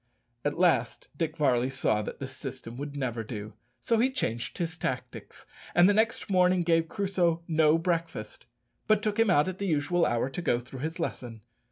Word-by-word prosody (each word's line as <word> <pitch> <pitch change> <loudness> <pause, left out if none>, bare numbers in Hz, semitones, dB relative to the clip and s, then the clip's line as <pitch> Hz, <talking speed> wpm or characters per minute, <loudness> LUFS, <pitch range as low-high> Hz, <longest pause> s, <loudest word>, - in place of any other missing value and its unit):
At 145 +2 -1
last 150 -10 +1
Dick 160 +1 -2
Varley 130 -4 +2
saw 130 -5 0
that - - -6
this 130 -1 -6
system 125 -4 -6
would 145 +1 -6
never 120 -4 -2
do, 105 -1 -7 0.3
so 230 -1 +1
he 250 +3 +4
changed 120 - -3
his 170 -1 -2
tactics, 130 -7 -5 0.3
and 175 +1 +7
the 205 - +4
next 220 +2 +1
morning 180 -2 +3
gave 165 -1 +2
Crusoe 180 -4 0
no 160 -1 +4
breakfast, 165 -12 -3 0.4
but 215 -1 +3
took 215 0 -1
him 225 -2 +4
out 165 -2 +4
at 185 0 -4
the 200 - -2
usual 170 +2 +2
hour 120 +1 0
to 135 +6 -5
go 145 -8 +2
through 130 +2 -9
his 160 +5 -4
lesson. 120 -8 -4
160 Hz, 190 wpm, -28 LUFS, 130-180 Hz, 0.4 s, and